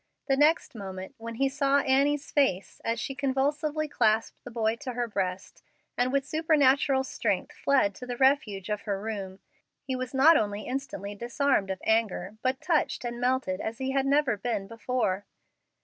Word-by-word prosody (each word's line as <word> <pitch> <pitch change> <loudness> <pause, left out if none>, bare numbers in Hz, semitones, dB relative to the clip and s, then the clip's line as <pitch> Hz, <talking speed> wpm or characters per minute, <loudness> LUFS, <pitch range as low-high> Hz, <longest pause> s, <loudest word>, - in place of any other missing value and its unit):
The 270 - +2
next 300 +4 +3
moment, 190 -3 -7
when 230 0 -6
he 275 +4 +2
saw 280 0 +2
Annie's 275 +2 +1
face 200 -10 0
as 230 0 -1
she 270 - -3
convulsively 290 +3 0
clasped 225 -6 +1
the - - -8
boy 225 -1 0
to 255 +1 -6
her 240 0 -1
breast, 190 -3 -4 0.3
and 250 +1 +1
with 275 0 +1
supernatural 280 -3 +3
strength - - -2
fled 265 -8 +2
to 250 - -9
the 245 -1 -4
refuge 250 -8 +2
of 210 -1 -1
her 195 -1 0
room, 200 -3 -5 0.4
he 265 -1 -3
was 255 0 -4
not 310 +5 +7
only 205 0 -1
instantly 250 -6 -4
disarmed 235 -1 0
of 190 -1 -4
anger, 220 -3 0
but 260 +1 -1
touched 325 -7 0
and 240 0 -4
melted 250 -7 0
as 225 +1 -4
he 265 +1 -2
had 270 0 +1
never 280 -5 +2
been 210 -2 -2
before. 225 -3 -2
250 Hz, 175 wpm, -28 LUFS, 210-275 Hz, 0.4 s, not